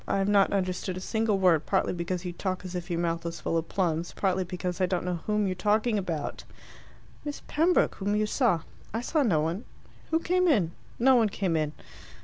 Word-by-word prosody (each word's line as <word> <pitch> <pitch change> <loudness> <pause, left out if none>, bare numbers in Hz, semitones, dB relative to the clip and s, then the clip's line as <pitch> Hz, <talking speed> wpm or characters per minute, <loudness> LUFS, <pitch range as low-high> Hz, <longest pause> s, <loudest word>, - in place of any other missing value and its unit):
I - - +1
have 195 0 +1
not 200 -1 +4
understood 185 -1 -1
a - - -3
single 220 +2 0
word, 175 -5 +3
partly 190 - +1
because 175 +1 -3
you 175 - -3
talk 185 +1 -3
as 180 - -6
if 180 0 -5
your 170 - -1
mouth 165 -1 -1
was 170 0 -5
full - - -2
of 165 0 -1
plums, 170 -3 -1
partly 190 -1 +1
because 180 0 -4
I 185 - +4
don't 180 -1 -1
know 180 -2 -1
whom 210 -1 +2
you're 190 - 0
talking 210 +3 +1
about." 165 -6 -4 0.8
"Miss 290 -1 -5
Pembroke 330 +4 +3
whom 205 +1 -1
you 215 0 +2
saw." 210 - +2 0.3
"I 225 - 0
saw 305 +5 +1
no 185 - +3
one." 165 +8 -2 0.5
"Who 325 - +3
came 365 +2 +2
in?" 205 - +3 0.3
"No 260 +3 +5
one 225 -3 +3
came 190 -4 -1
in." 155 -1 0
185 Hz, 215 wpm, -28 LUFS, 175-210 Hz, 0.8 s, No